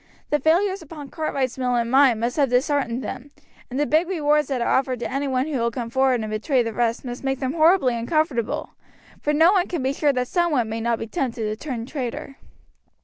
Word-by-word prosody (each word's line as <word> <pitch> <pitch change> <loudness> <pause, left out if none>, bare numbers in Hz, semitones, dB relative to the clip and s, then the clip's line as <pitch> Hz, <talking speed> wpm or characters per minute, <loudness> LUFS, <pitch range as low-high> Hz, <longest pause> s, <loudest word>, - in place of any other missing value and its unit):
The 295 - +3
failures 375 +6 +2
upon 300 -3 -10
Cartwright's 270 -5 -2
mill 250 -1 +1
and 235 -1 0
mine 260 -4 +5
must 240 +2 -1
have 280 -3 +3
disheartened 255 -1 0
them, 270 +4 -6 0.4
and 260 +2 -3
the 295 - +2
big 315 +4 +2
rewards 300 -4 +1
that 270 -3 -2
are 235 - -1
offered 260 -2 0
to - - -3
any 275 +2 -1
one 260 0 0
who 295 -4 -2
will 235 0 +1
come 235 -1 -5
forward 265 -2 +2
and 215 - -4
betray 245 +4 +1
the 230 -1 -4
rest 235 +2 -1
must 245 +1 -6
make 270 -1 -1
them 265 0 -2
horribly 320 -5 +4
uncomfortable, 240 0 -1 0.5
for 295 - 0
no 320 +4 +5
one 370 -3 +2
can 340 -7 -3
be 265 +1 0
sure 290 0 +2
that 250 -2 -1
some 345 +2 +1
one 245 -6 +1
may 225 +1 -3
not 235 0 0
be 225 - -5
tempted 245 -3 -3
to 215 0 -2
turn 235 -2 -5
traitor." 270 0 -5
265 Hz, 230 wpm, -23 LUFS, 240-300 Hz, 0.5 s, mine